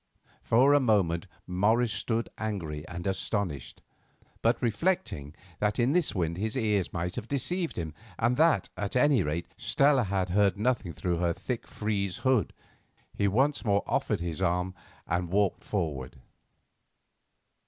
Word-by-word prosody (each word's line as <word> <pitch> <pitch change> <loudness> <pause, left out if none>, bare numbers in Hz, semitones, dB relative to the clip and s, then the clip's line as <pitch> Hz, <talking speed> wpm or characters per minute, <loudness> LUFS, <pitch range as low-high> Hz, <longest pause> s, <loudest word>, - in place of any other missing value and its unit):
For 130 +5 +4
a 145 - +6
moment 100 -8 +2 0.2
Morris 110 +5 +2
stood 115 +2 -1
angry 80 -9 -4
and 85 0 -6
astonished, 95 - -2 0.6
but 115 +1 +2
reflecting 110 - -1 0.2
that 105 0 +1
in 125 +2 +3
this 170 -5 +2
wind 85 -2 -1
his 110 +5 -2
ears 105 -6 +1
might 90 +1 -3
have 120 -2 -4
deceived 165 +7 -1
him, 80 -3 -4 0.2
and 120 +2 +2
that, 155 - +3
at 100 +3 -4
any 130 -2 +4
rate, 80 +1 -2
Stella 140 -3 +3
had 95 -1 -1
heard 100 0 +3
nothing 110 -4 0
through 85 +1 -2
her 85 0 +1
thick 120 +7 -5
frieze 100 -4 -2
hood, 130 - +3 0.6
he 100 - +1
once 135 +9 +2
more 100 -3 +2
offered 105 -5 0
his 85 -3 -4
arm 90 +2 0 0.3
and 85 +1 -1
walked 100 +1 +1
forward. 75 -10 -3
100 Hz, 145 wpm, -29 LUFS, 90-120 Hz, 0.6 s, a